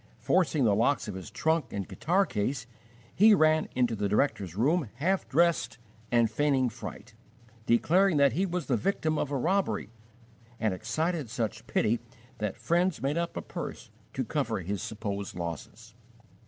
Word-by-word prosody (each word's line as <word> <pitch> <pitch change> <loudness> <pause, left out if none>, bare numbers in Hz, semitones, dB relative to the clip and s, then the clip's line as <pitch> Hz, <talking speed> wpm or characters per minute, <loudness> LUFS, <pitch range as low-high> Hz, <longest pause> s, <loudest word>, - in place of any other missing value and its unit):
Forcing 165 -6 +2
the 110 -4 +4
locks 115 +5 +2
of 105 - -4
his 95 -1 -7
trunk 160 -6 0
and 100 -2 -4
guitar 190 +4 +1
case, 130 - -2 0.5
he 210 +3 +7
ran 155 -2 +3
into 120 -2 +2
the 100 -1 -1
director's 100 - 0
room 140 - +1
half 185 +6 0
dressed 170 -6 +2 0.3
and 120 -1 +4
feigning 135 +2 +1
fright, 115 0 -9 0.5
declaring 170 +9 +4
that 140 -3 +4
he 190 +7 +1
was 175 -3 -3
the 125 -2 +1
victim 155 - 0
of 145 - -1
a 140 - -1
robbery, 165 - 0 0.7
and 110 -4 +1
excited 145 - -2
such 110 -1 -3
pity 115 +2 +1 0.4
that 105 -2 -2
friends 175 +1 +1
made 145 +5 0
up 170 0 -3
a - - -4
purse - - -7 0.2
to - - -1
cover - - -1
his 95 +2 -3
supposed 100 -2 -4
losses. 90 +6 -7
130 Hz, 160 wpm, -29 LUFS, 110-165 Hz, 0.7 s, he